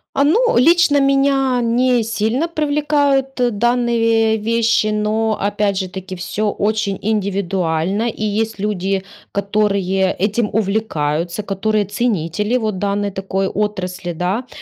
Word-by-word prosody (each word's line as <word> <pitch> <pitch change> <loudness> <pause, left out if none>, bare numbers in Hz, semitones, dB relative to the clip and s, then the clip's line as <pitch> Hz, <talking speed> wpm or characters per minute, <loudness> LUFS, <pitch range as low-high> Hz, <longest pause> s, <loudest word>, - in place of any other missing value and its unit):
А 280 - +3
ну, 465 +11 +3
лично 310 +2 +5
меня 275 -2 +2
не 245 +1 +2
сильно 225 +8 -1
привлекают 290 -3 +1
данные 235 -1 +2
вещи, 230 0 +1
но 215 +1 0
опять 205 -1 0
же 190 - -2
таки 190 +1 -7
всё 205 +4 -2
очень 205 -1 -1
индивидуально, 195 -1 -1
и 215 - -4
есть 220 +1 -1
люди, 195 -1 -1 0.3
которые 200 -2 0
этим 210 +3 0
увлекаются, 190 -4 -1
которые 210 +1 0
ценители 210 +1 -1
вот 215 -5 -2
данной 200 0 -1
такой 190 0 -2
отрасли, 185 -4 -3
да. 185 +9 -2
210 Hz, 120 wpm, -18 LUFS, 195-235 Hz, 0.3 s, лично